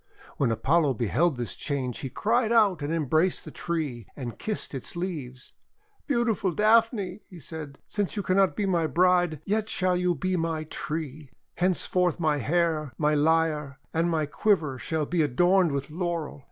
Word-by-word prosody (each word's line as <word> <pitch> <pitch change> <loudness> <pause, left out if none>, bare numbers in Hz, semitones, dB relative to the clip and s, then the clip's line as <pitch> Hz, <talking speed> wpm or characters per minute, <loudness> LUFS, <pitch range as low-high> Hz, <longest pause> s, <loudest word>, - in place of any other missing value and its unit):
When 135 - +2
Apollo 135 +5 +2
beheld 130 - +1
this 120 -1 -4
change 130 -4 -3
he 135 - -4
cried 225 - +1
out 205 -8 +4
and 145 +2 -2
embraced 160 +3 +1
the - - -8
tree, 145 - -3
and 125 -4 -6
kissed 215 -7 -3
its 135 +4 -5
leaves. 150 -8 -5 0.5
"Beautiful 230 - +1
Daphne," 215 -2 +2
he 180 - -11
said, 150 -2 -8
"since 205 -1 -2
you 205 - -2
can 185 - +1
not 190 -6 +3
be 210 - -1
my 170 -4 +1
bride, 175 -2 +2
yet 215 +2 0
shall 185 -1 +1
you 180 0 +1
be 185 +6 -1
my 165 -2 -1
tree. 155 -2 -5 0.2
Henceforth 180 0 +1
my 155 -3 +2
hair, 155 0 0
my 150 0 +2
lyre, 150 -2 +1 0.2
and 165 +1 +1
my 160 -2 +1
quiver 150 -4 +1
shall 160 +1 -1
be 170 +2 0
adorned 175 +5 +3
with 140 +1 -3
Laurel. 170 -3 -3
165 Hz, 165 wpm, -27 LUFS, 145-185 Hz, 0.5 s, out